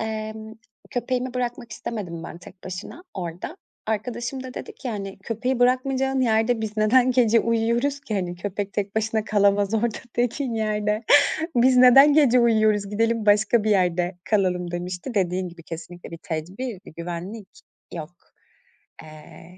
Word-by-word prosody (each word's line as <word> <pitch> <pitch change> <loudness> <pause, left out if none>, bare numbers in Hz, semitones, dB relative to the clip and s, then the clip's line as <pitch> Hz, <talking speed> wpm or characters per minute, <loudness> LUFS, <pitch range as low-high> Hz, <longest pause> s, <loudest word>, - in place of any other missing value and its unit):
emm, 220 0 -5 0.4
köpeğimi 255 0 -2
bırakmak 245 -2 -3
istemedim 185 -8 -5
ben - - -8
tek 180 +1 -15
başına 190 - -8
orada. 180 - -6 0.3
Arkadaşım 235 +4 -3
da 255 -1 -8
dedi - - -7
ki 260 - -7
hani: 195 -2 -6
"Köpeği 240 +5 -2
bırakmayacağın 265 +1 +2
yerde 225 0 +2
biz 220 -1 -4
neden 245 +4 +4
gece 235 -3 +4
uyuyoruz 235 +5 0
ki, 255 -7 -5
hani, 180 -2 -2
köpek 200 +2 -4
tek 205 0 -3
başına 220 0 0
kalamaz 205 0 +2
orada 225 0 0 0.2
tekin 245 +1 -1
yerde. 210 0 -1 0.5
Biz 250 +1 +5
neden 270 +4 +8
gece 270 -5 +5
uyuyoruz 215 -3 +3
gidelim 225 +1 0
başka 210 +2 +4
bir 215 - 0
yerde 180 -1 +1
kalalım." 180 -4 0
demişti. 180 +6 -5
Dediğin 185 -2 0
gibi 170 -1 -14
kesinlikle 170 +2 -9
bir 165 - -8
tedbir, 185 +6 -5
bir - - -12
güvenlik 180 +5 -6 0.4
yok. 165 0 -6 0.9
Eee, 155 +3 -14
215 Hz, 145 wpm, -24 LUFS, 185-240 Hz, 0.9 s, neden